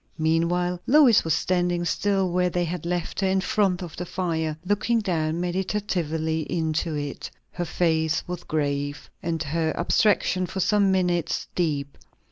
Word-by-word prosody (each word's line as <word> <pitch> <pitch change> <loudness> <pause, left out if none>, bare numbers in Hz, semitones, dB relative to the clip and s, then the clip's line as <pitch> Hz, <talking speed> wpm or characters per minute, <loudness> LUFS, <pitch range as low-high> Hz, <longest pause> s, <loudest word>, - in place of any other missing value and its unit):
Meanwhile 175 +3 +1
Lois 270 -5 +6
was 160 -1 +1
standing 175 -1 0
still 195 +2 +1
where 180 0 +2
they 175 0 0
had 170 0 -4
left 175 -1 -2
her, 195 - +2
in 190 0 +2
front 190 -2 +1
of 170 -4 -8
the 180 - -4
fire; 160 -4 -2
looking 210 +4 +1
down 165 -5 -1
meditatively 175 -4 -1
into 160 -1 -1
it. 145 -1 -4 0.2
Her 175 - -3
face 160 -2 0
was 175 -1 -5
grave, 145 -1 -2
and 165 -1 -2
her 160 +2 -1
abstraction 185 -3 +2
for 190 - -5
some 200 0 +3
minutes 180 -3 0
deep. 145 -5 -2
175 Hz, 150 wpm, -25 LUFS, 160-185 Hz, 0.2 s, Lois